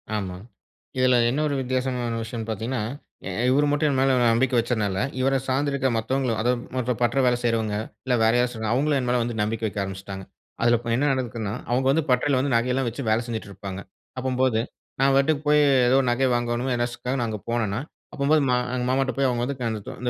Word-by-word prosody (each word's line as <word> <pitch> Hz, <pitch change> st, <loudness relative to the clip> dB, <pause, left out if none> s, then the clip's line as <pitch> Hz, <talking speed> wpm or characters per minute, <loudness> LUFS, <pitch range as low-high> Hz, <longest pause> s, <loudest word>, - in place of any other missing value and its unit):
ஆமாங்க. 95 Hz, 0 st, -5 dB, 0.5 s
இதுல 130 Hz, -1 st, +4 dB
என்ன 135 Hz, +5 st, -1 dB
ஒரு 145 Hz, -, -1 dB
வித்தியாசமான 125 Hz, -2 st, -2 dB
விஷயம்னு 115 Hz, 0 st, -6 dB
பார்த்தீங்கன்னா. 110 Hz, +2 st, -2 dB, 0.7 s
இவர் 145 Hz, +3 st, +3 dB
மட்டும் 145 Hz, +1 st, +2 dB
என் 135 Hz, -, 0 dB
மேல 135 Hz, 0 st, +3 dB, 0.2 s
நம்பிக்க 130 Hz, +2 st, +1 dB
வச்சனால, 110 Hz, -5 st, -1 dB, 0.2 s
இவர 135 Hz, +1 st, +2 dB
சார்ந்து 140 Hz, +2 st, +1 dB
இருக்க 135 Hz, -1 st, 0 dB
மத்தவங்களும், 120 Hz, +1 st, -1 dB
அதாவது 120 Hz, +1 st, +1 dB
மற்ற 125 Hz, -1 st, 0 dB
பற்ற 120 Hz, +3 st, +1 dB
வேல 125 Hz, -1 st, +4 dB
செய்றவங்க 110 Hz, -3 st, 0 dB, 0.3 s
இல்ல, 130 Hz, -, +1 dB
வேற 110 Hz, -, +5 dB
யாராச்சுங்க 115 Hz, -3 st, -1 dB
அவங்களும் 145 Hz, +3 st, +2 dB
என் 125 Hz, -, -3 dB
மேல 125 Hz, -, +2 dB
வந்து 120 Hz, -1 st, -3 dB
நம்பிக்க 110 Hz, +2 st, -2 dB
வைக்க 105 Hz, 0 st, -5 dB
ஆரம்பிச்சிட்டாங்க. 95 Hz, 0 st, -7 dB, 0.4 s
அதுல 120 Hz, 0 st, +4 dB
இப்ப 120 Hz, -, -6 dB
என்ன 140 Hz, -, +1 dB
நடக்குதுன்னா, 115 Hz, -5 st, -3 dB, 0.2 s
அவங்க 130 Hz, +2 st, +1 dB
வந்து 160 Hz, +3 st, +2 dB
பட்டறையில 130 Hz, +2 st, +2 dB
வந்து 135 Hz, 0 st, 0 dB
நகை 120 Hz, +2 st, +2 dB
எல்லாம் 130 Hz, -2 st, 0 dB
வச்சி 120 Hz, +4 st, -6 dB
வேல 115 Hz, +2 st, +2 dB
செஞ்சிட்டு 110 Hz, -3 st, -5 dB
இருப்பாங்க. 100 Hz, 0 st, -7 dB, 0.4 s
அப்பம்போது, 130 Hz, -3 st, +1 dB, 0.4 s
நான் 135 Hz, 0 st, +4 dB
பாட்டுக்கு 140 Hz, +2 st, +2 dB
போய் 150 Hz, 0 st, +5 dB, 0.3 s
ஏதோ 130 Hz, -, +4 dB
நகை 130 Hz, +2 st, +2 dB
வாங்கணும் 120 Hz, +2 st, -1 dB
எனசுக்கா 120 Hz, +1 st, -3 dB
நான் 120 Hz, -, 0 dB
அங்க 105 Hz, -, -4 dB
போனேன்னா. 110 Hz, -3 st, 0 dB, 0.3 s
அப்பம்போது 150 Hz, +2 st, +2 dB
மா 125 Hz, -, +3 dB, 0.2 s
எங்க 125 Hz, -1 st, -1 dB
மாமாட்ட 135 Hz, +1 st, +1 dB
போய் 135 Hz, -1 st, +3 dB
அவங்க 120 Hz, -1 st, -1 dB
வந்து 140 Hz, +1 st, -3 dB, 0.5 s
இந்த 125 Hz, -, 0 dB
125 Hz, 195 wpm, -24 LUFS, 115-130 Hz, 0.7 s, வேற